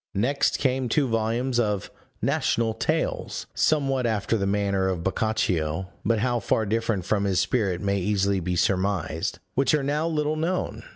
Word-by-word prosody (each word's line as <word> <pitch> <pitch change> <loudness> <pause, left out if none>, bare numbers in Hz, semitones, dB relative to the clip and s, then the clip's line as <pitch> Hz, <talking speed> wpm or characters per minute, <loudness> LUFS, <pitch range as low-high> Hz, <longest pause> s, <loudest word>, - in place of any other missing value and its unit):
Next 130 +8 +1
came 130 -2 0
two 140 +3 +2
volumes 115 +2 0
of 105 -4 -1 0.3
National 115 -1 +1
Tales, - - -2
somewhat 135 -5 +2
after 110 0 0
the 100 -3 0
manner 100 -1 +1
of 90 -3 -2
Boccaccio 95 -4 0
(but 115 +2 +2
how 120 +2 +1
far 110 +1 +1
different 110 -3 -1
from 100 0 +1
his 95 -2 +2
spirit 95 -2 0
may 100 -1 0
easily 100 0 +1
be 90 0 -2
surmised), 95 -3 0 0.2
which 135 +3 +3
are 145 - 0
now 150 +4 0
little 155 -1 0
known. 170 +4 -2
110 Hz, 160 wpm, -25 LUFS, 95-130 Hz, 0.3 s, which